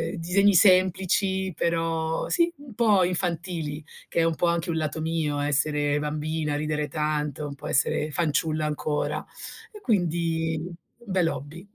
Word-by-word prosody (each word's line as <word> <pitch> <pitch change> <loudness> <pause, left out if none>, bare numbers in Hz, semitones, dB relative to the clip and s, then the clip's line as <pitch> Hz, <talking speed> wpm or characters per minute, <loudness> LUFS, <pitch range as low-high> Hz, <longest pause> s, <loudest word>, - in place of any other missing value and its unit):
disegni 190 +4 +3
semplici, 190 0 +4
però 165 -1 -1
sì, 340 -1 +3
un 280 -5 -13
po' 210 -5 +3
infantili, 170 -4 -1 0.2
che - - -2
è 165 - +4
un 165 -1 +1
po' 175 - +1
anche 170 +1 0
un 160 - -1
lato 155 0 -2
mio 160 -3 -1
essere 145 0 +1
bambina, 150 0 -2
ridere 150 0 -2
tanto, 150 -1 -2
un 140 - -7
po' - - -9
essere 150 +2 +1
fanciulla 155 -1 0
ancora. 150 0 -2 0.5
E 420 -2 -12
quindi 165 -6 0
un 175 +6 -10
bell'hobby. 170 0 -2
165 Hz, 145 wpm, -25 LUFS, 150-180 Hz, 0.5 s, semplici